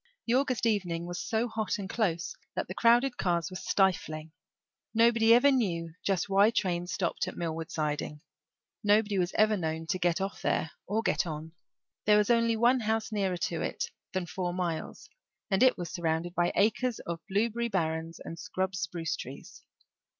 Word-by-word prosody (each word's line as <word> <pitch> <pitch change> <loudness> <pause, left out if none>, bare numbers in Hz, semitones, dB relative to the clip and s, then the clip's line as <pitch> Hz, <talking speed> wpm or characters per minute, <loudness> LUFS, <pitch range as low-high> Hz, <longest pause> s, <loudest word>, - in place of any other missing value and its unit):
The 230 - +1
August 255 -2 +1
evening 180 -6 0
was 175 0 -4
so 230 0 +1
hot 220 -3 -2
and 200 -2 -5
close 185 -6 -1 0.2
that - - -2
the - - -5
crowded 240 +2 +4
cars 170 -2 0
were - - -7
stifling. 160 -5 0 0.6
Nobody 230 0 +5
ever 250 +5 +7
knew 170 -10 0
just 195 -3 0
why 200 +2 +5
trains 180 -6 -1
stopped 195 -4 -1
at - - -6
Millward 165 -1 -3
siding. 150 -2 -3 0.6
Nobody 205 -1 +3
was 180 0 0
ever 215 0 +4
known 160 -3 -3
to 185 +2 -1
get 175 0 +1
off 195 +1 -4
there 160 - 0 0.2
or 220 +3 0
get - - +1
on. 155 0 -6 0.5
There 210 0 +6
was 210 +2 +3
only 230 -1 +3
one 240 +3 +4
house 220 0 -1
nearer 195 -4 0
to 165 -1 -2
it - - -3 0.2
than 185 -2 -2
four 175 +1 -3
miles, 175 -3 -3 0.4
and 195 - +2
it 255 0 +5
was 175 -3 -5
surrounded 170 0 -1
by 175 -1 +1
acres 225 +3 +2
of 170 -1 -5
blueberry 230 +4 +1
barrens 165 -3 -2
and 165 - -8
scrub 190 0 -2
spruce 165 -2 -2
trees. 135 +3 -9
190 Hz, 175 wpm, -29 LUFS, 170-220 Hz, 0.6 s, ever